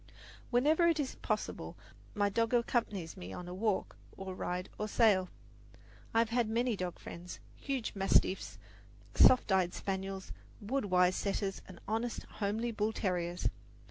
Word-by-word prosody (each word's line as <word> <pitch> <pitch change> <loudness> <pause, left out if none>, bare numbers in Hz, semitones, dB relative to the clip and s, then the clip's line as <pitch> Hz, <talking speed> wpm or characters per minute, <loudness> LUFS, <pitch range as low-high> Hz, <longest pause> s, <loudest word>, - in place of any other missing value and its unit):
Whenever 300 +7 +4
it 330 -2 +3
is 275 -3 -1
possible, - - -3 0.4
my 205 -1 +3
dog 230 +4 +1
accompanies 210 -8 0
me 90 +1 -8
on 175 - -7
a 180 - -6
walk 205 +1 -1 0.2
or 190 -1 -5
ride 180 0 -3
or 215 - -1
sail. 200 -5 +4 0.8
I - - -1
have 230 -1 +4
had 235 -1 +1
many 235 +1 +1
dog 180 -2 -4
friends 175 +1 -8 0.2
huge 270 -5 -3
mastiffs, 195 -1 +2 0.6
soft 255 -4 +6
eyed 185 -2 +2
spaniels, 190 0 -4 0.3
wood 230 +3 -1
wise 180 -1 +4
setters 195 -1 -2
and 185 -2 -11
honest, 225 +3 -2
homely 220 +3 -1
bull 215 0 0
terriers. 175 -4 -1
205 Hz, 145 wpm, -33 LUFS, 185-230 Hz, 0.8 s, soft